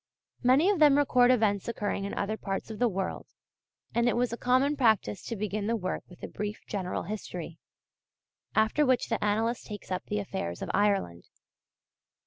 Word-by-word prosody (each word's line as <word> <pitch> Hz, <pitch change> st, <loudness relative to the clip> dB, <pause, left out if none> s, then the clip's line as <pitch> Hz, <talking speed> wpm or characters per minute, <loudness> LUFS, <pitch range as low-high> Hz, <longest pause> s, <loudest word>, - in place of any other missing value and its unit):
Many 260 Hz, +7 st, +4 dB
of 390 Hz, -, -1 dB
them 295 Hz, -2 st, +6 dB
record 250 Hz, -4 st, +4 dB
events 215 Hz, -6 st, +2 dB
occurring 205 Hz, -3 st, -2 dB
in 200 Hz, -, -4 dB
other 205 Hz, +2 st, -1 dB
parts 195 Hz, 0 st, -4 dB
of 215 Hz, -, -7 dB
the 245 Hz, -1 st, +3 dB
world; 190 Hz, -1 st, -3 dB, 0.7 s
and 235 Hz, +1 st, +3 dB
it -, -, 0 dB
was 245 Hz, -1 st, +1 dB
a -, -, 0 dB
common 260 Hz, +4 st, +2 dB
practice 220 Hz, -, +2 dB
to 230 Hz, -, -3 dB
begin 210 Hz, 0 st, -2 dB
the 230 Hz, -, +1 dB
work 185 Hz, -4 st, -3 dB
with 180 Hz, -, -16 dB
a -, -, -3 dB
brief 210 Hz, +1 st, -5 dB
general 190 Hz, -3 st, -3 dB
history, 175 Hz, -4 st, -6 dB, 1.0 s
after 220 Hz, +7 st, +3 dB
which 255 Hz, -3 st, +2 dB
the 225 Hz, -, -1 dB
annalist 225 Hz, +3 st, 0 dB
takes 205 Hz, -3 st, -8 dB
up 185 Hz, -, -2 dB
the 210 Hz, -, -2 dB
affairs 85 Hz, -, -4 dB
of -, -, -3 dB
Ireland. 195 Hz, -, +1 dB
215 Hz, 180 wpm, -29 LUFS, 195-245 Hz, 1.0 s, them